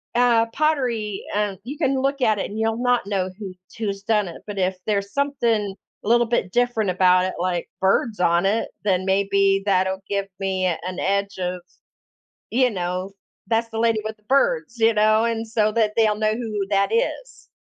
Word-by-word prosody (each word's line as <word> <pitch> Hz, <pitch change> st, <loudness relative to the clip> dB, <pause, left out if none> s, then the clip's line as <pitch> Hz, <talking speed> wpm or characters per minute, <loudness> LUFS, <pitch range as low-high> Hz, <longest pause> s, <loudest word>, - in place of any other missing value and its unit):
uh, 235 Hz, -2 st, +4 dB
pottery, 240 Hz, -7 st, -1 dB
um, 205 Hz, -2 st, -1 dB
you 280 Hz, +5 st, -7 dB
can 270 Hz, -4 st, +1 dB
look 275 Hz, 0 st, -1 dB
at 215 Hz, -3 st, +3 dB
it -, -, -3 dB
and 215 Hz, +2 st, -6 dB
you'll 225 Hz, +2 st, 0 dB
not 245 Hz, -4 st, +1 dB
know 190 Hz, -2 st, -1 dB
who 195 Hz, -3 st, -6 dB, 0.2 s
who's 200 Hz, -3 st, -3 dB
done 210 Hz, -2 st, +1 dB
it, 170 Hz, -, -9 dB
but 205 Hz, -1 st, -7 dB
if 185 Hz, 0 st, 0 dB
there's 200 Hz, -1 st, -1 dB
something 235 Hz, -8 st, 0 dB, 0.3 s
a -, -, -8 dB
little 240 Hz, 0 st, +4 dB
bit 220 Hz, -6 st, -1 dB
different 240 Hz, -4 st, +1 dB
about 185 Hz, 0 st, +4 dB
it, 185 Hz, -, -3 dB
like, 175 Hz, -1 st, -2 dB
birds 205 Hz, +3 st, +1 dB
on 170 Hz, +1 st, +3 dB
it, 215 Hz, +3 st, +1 dB
then 185 Hz, -2 st, +1 dB
maybe 195 Hz, 0 st, +2 dB
that'll 190 Hz, 0 st, +1 dB
give 200 Hz, -1 st, -1 dB
me 190 Hz, -1 st, -1 dB
an 180 Hz, +1 st, -2 dB
edge 200 Hz, 0 st, -1 dB
of, 180 Hz, 0 st, -3 dB, 0.9 s
you 250 Hz, +1 st, +3 dB
know, 185 Hz, -1 st, -3 dB, 0.4 s
"That's 230 Hz, 0 st, 0 dB
the 225 Hz, 0 st, -4 dB
lady 230 Hz, -1 st, +2 dB
with 220 Hz, 0 st, -5 dB
the 210 Hz, -, -33 dB
birds," 275 Hz, -, +1 dB
you 225 Hz, 0 st, +4 dB
know, 215 Hz, +1 st, +3 dB
and, 230 Hz, -1 st, -2 dB
so, 215 Hz, -1 st, +1 dB
that 215 Hz, -2 st, +1 dB
they'll 215 Hz, -2 st, +3 dB
know 215 Hz, 0 st, +1 dB
who 215 Hz, -4 st, -3 dB
that 200 Hz, -1 st, +2 dB
is. -, -, -2 dB
210 Hz, 190 wpm, -22 LUFS, 195-230 Hz, 0.9 s, uh